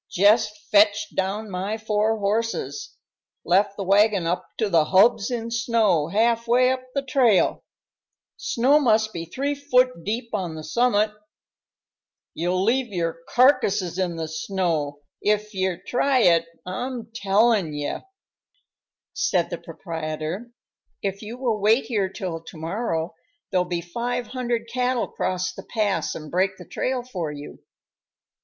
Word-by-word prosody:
Jest 210 +2 +3
fetched 210 0 +4
down 200 +3 -2
my 195 +4 -2
four 215 0 0
horses 225 - -2 0.5
left 195 +3 +2
the 200 - -3
wagon 200 -1 +3
up 175 +2 -1
to 220 - +1
the 165 -5 +3
hubs 200 +5 +4
in 230 -2 -3
snow 230 -9 +2
half 230 +5 +1
way 250 +2 +4
up 260 0 -1
the 275 - 0
trail 255 -7 +3 0.7
snow 265 +5 +3
must 220 -5 +2
be 165 -1 -5
three 275 - -2
foot 255 - +1
deep 230 +4 -3
on 180 -6 -2
the 155 - -7
summit. 215 +4 +2 1.2
You'll 180 +3 0
leave 245 +4 +2
your 165 -3 -2
carcasses 215 - +3
in 180 -2 -1
the 165 -1 -3
snow, 160 -4 -2 0.2
if 210 +1 0
ye 185 -2 -1
try 260 +1 +2
it, 170 -4 +4 0.2
I'm 230 +4 -5
tellin' 200 -5 +2
ye." 145 0 -2 1.2
Said - - 0
the - - -4
proprietor, 160 +5 -5 0.5
"If 195 0 -2
you 225 +3 -7
will 240 -5 -1
wait 220 +5 +4
here 205 -6 0
till 180 -5 -5
to - - -11
morrow, 165 -1 -2 0.4
there'll 180 -2 +2
be 175 -1 -2
five 240 +8 -3
hundred 240 -2 -3
cattle 250 0 0
cross 185 0 -2
the - - -8
pass 210 -4 -1
and 155 -2 -8
break 190 +2 +1
the 180 - -11
trail 255 +6 -2
for 180 -11 -4
you." 145 0 -9
210 Hz, 145 wpm, -24 LUFS, 180-235 Hz, 1.2 s, fetched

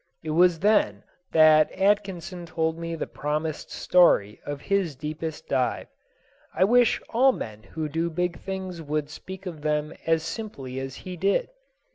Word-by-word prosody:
It 155 - -3
was 175 +1 +4
then 180 - +3 0.3
that 155 -1 +6
Atkinson 190 -3 0
told 160 0 -1
me 165 0 -4
the - - -3
promised 150 +1 -3
story 105 - +3
of 145 -1 -5
his 195 -7 0
deepest 155 +3 -5
dive. 125 - 0 0.7
I 185 - +4
wish 240 +3 +4
all 260 +3 +5
men 110 - -7
who 155 +6 -5
do 165 +3 -1
big 175 +1 -2
things 190 -3 -5
would 150 -1 -2
speak 190 +4 -9
of 165 -5 -6
them 150 0 -1
as 165 -1 +2
simply 135 - -5
as 135 0 -5
he 180 -1 -6
did. 200 - +1
165 Hz, 155 wpm, -26 LUFS, 150-185 Hz, 0.7 s, that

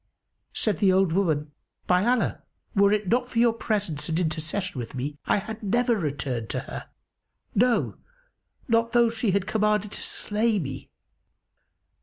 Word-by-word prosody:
Said 210 -7 -1
the 195 -2 +5
old 190 -2 +3
woman, 155 -6 +1 0.3
"By 180 +1 +3
Allah, 245 +1 +1 0.3
were 200 0 +5
it 210 -2 +1
not 245 +2 +1
for 235 - -6
your 235 0 +5
presence 200 -10 -2
and 160 +1 0
intercession 160 0 -2
with 120 +2 -6
me, 145 +3 -4
I - - +3
had 220 +2 -5
never 235 +3 +2
returned 140 - -2
to - - -2
her; - - -8 0.6
no, 240 +3 +2 0.7
not 230 -1 +2
though 235 -1 +5
she 225 -1 -1
had 195 0 +1
commanded 210 -1 +1
to - - -6
slay 215 +1 0
me!" 135 -7 -5
200 Hz, 155 wpm, -26 LUFS, 160-225 Hz, 0.7 s, the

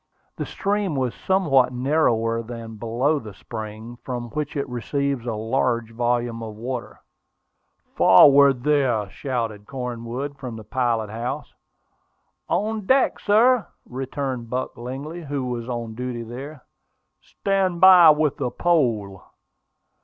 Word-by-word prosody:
The - - -4
stream 200 -4 -1
was 130 -3 -1
somewhat 150 -10 +2
narrower 120 -4 +1
than 115 -1 -8
below 120 +7 0
the 105 -6 -10
spring, 110 +3 -8
from 120 -2 -5
which 150 0 -3
it 140 0 -2
receives 130 +1 -2
a 115 - -1
large 115 +1 -1
volume 120 0 -1
of 110 -2 -7
water. 120 +2 -6 0.9
"Forward, 140 -3 +6
there!" 130 -8 +2
shouted 115 -5 -4
Cornwood 125 +2 -5
from 125 -4 -6
the 110 - -9
pilot 115 -2 -1
house. 115 +3 -5 1.0
"On 215 -1 -1
deck, 265 0 +3
sir!" 220 0 +3 0.2
returned 130 -2 -4
Buck 125 +2 -3
Lingley, 135 +8 -6
who 140 -2 -3
was 120 -1 -4
on 120 -2 -4
duty 125 0 -4
there. 130 +5 -9 0.6
"Stand 190 -3 -1
by 180 -2 +9
with 150 -1 +3
the - - -1
pole." 115 - 0
125 Hz, 125 wpm, -23 LUFS, 115-145 Hz, 1.0 s, by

